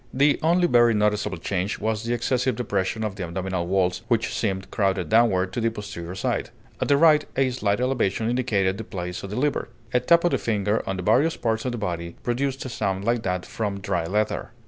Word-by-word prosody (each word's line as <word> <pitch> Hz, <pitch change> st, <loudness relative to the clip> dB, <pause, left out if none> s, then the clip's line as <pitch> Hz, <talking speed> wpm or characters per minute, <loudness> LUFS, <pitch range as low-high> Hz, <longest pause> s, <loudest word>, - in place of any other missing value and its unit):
The 140 Hz, +2 st, +3 dB
only 175 Hz, +3 st, +3 dB
very 120 Hz, -5 st, +5 dB
noticeable 105 Hz, 0 st, +1 dB
change 95 Hz, +1 st, -2 dB
was 110 Hz, 0 st, -1 dB
the 115 Hz, +1 st, -1 dB
excessive 125 Hz, +1 st, 0 dB
depression 105 Hz, -2 st, -1 dB
of 105 Hz, -2 st, -2 dB
the 95 Hz, -, -3 dB
abdominal 90 Hz, 0 st, -3 dB
walls, 90 Hz, -1 st, +1 dB
which 115 Hz, -1 st, +1 dB
seemed 95 Hz, -3 st, -2 dB
crowded 95 Hz, -3 st, 0 dB
downward 95 Hz, -5 st, +3 dB
to 120 Hz, -, -2 dB
the 115 Hz, -, +2 dB
posterior 100 Hz, -5 st, -7 dB
side; 95 Hz, -, -1 dB, 0.3 s
at -, -, +1 dB
the 140 Hz, -, +4 dB
right, 155 Hz, -1 st, +6 dB
a 135 Hz, -1 st, +3 dB
slight 105 Hz, -4 st, 0 dB
elevation 115 Hz, -4 st, 0 dB
indicated 110 Hz, -6 st, 0 dB
the -, -, -4 dB
place 90 Hz, -3 st, -5 dB
of 100 Hz, -, -7 dB
the 105 Hz, -, -5 dB
liver. 145 Hz, +3 st, 0 dB, 0.2 s
A 125 Hz, -, +4 dB
tap 170 Hz, +7 st, +4 dB
of 175 Hz, -, +3 dB
the -, -, +1 dB
finger 105 Hz, -1 st, 0 dB
on 95 Hz, -, -2 dB
the 90 Hz, -, -4 dB
various 150 Hz, -, +3 dB
parts 110 Hz, 0 st, -1 dB
of 125 Hz, -, 0 dB
the -, -, -3 dB
body 85 Hz, -5 st, -4 dB
produced 135 Hz, +3 st, -1 dB
a -, -, -4 dB
sound 100 Hz, -4 st, -2 dB
like 120 Hz, 0 st, +1 dB
that 90 Hz, -3 st, -2 dB
from 100 Hz, -3 st, -3 dB
dry 90 Hz, -4 st, -1 dB
leather. 105 Hz, +5 st, -1 dB
110 Hz, 215 wpm, -24 LUFS, 95-125 Hz, 0.3 s, right